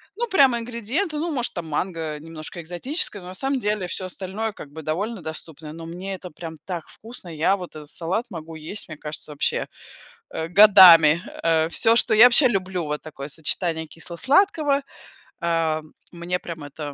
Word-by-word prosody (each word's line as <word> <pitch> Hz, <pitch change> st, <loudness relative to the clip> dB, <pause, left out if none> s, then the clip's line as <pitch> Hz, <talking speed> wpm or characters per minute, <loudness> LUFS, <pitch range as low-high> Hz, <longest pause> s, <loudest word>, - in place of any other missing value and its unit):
Ну, 475 Hz, +3 st, -2 dB
прямо 275 Hz, -, +4 dB
ингредиенты, 245 Hz, -, -3 dB
ну, 325 Hz, +2 st, -2 dB
может, 250 Hz, -4 st, -2 dB
там, 170 Hz, -3 st, -5 dB
манго 160 Hz, -1 st, -3 dB
немножко 160 Hz, +2 st, -7 dB
экзотическое, 195 Hz, -, -3 dB
но, 180 Hz, -, -11 dB
на -, -, -8 dB
самом 270 Hz, +6 st, -1 dB
деле, 210 Hz, -4 st, -1 dB
всё 185 Hz, -, -4 dB
остальное, 195 Hz, +4 st, -4 dB
как 145 Hz, -, -11 dB
бы, 160 Hz, +2 st, -8 dB
довольно 195 Hz, +8 st, -3 dB
доступное, 160 Hz, -1 st, -8 dB
но 165 Hz, 0 st, -9 dB
мне 185 Hz, +4 st, -6 dB
это 180 Hz, -2 st, -10 dB
прям 165 Hz, -2 st, -8 dB
так 175 Hz, -4 st, -5 dB
вкусно. 225 Hz, -5 st, -10 dB
Я 160 Hz, +5 st, +2 dB
вот 180 Hz, -4 st, -9 dB
этот 150 Hz, -1 st, -10 dB
салат 180 Hz, +8 st, -2 dB
могу 165 Hz, -1 st, -8 dB
есть, 160 Hz, +7 st, -4 dB
мне 155 Hz, -, -8 dB
кажется, 150 Hz, 0 st, -5 dB
вообще, 145 Hz, -, -1 dB, 0.7 s
э, 160 Hz, -, -3 dB
годами! 175 Hz, -6 st, +9 dB, 0.2 s
Э, 160 Hz, -1 st, +3 dB
всё, 225 Hz, +6 st, +3 dB
что 220 Hz, -1 st, +4 dB
я 220 Hz, +2 st, +8 dB
вообще 250 Hz, +2 st, +8 dB
люблю, 185 Hz, -5 st, -2 dB
вот 150 Hz, 0 st, -4 dB
такое 140 Hz, -2 st, -8 dB
сочетание 160 Hz, +2 st, -1 dB
кисло-сладкого, 280 Hz, -, +1 dB, 0.6 s
э, 165 Hz, -2 st, 0 dB, 0.3 s
мне 175 Hz, +1 st, -3 dB
прям 165 Hz, -4 st, -8 dB
это 145 Hz, 0 st, -7 dB
175 Hz, 175 wpm, -23 LUFS, 160-220 Hz, 0.7 s, годами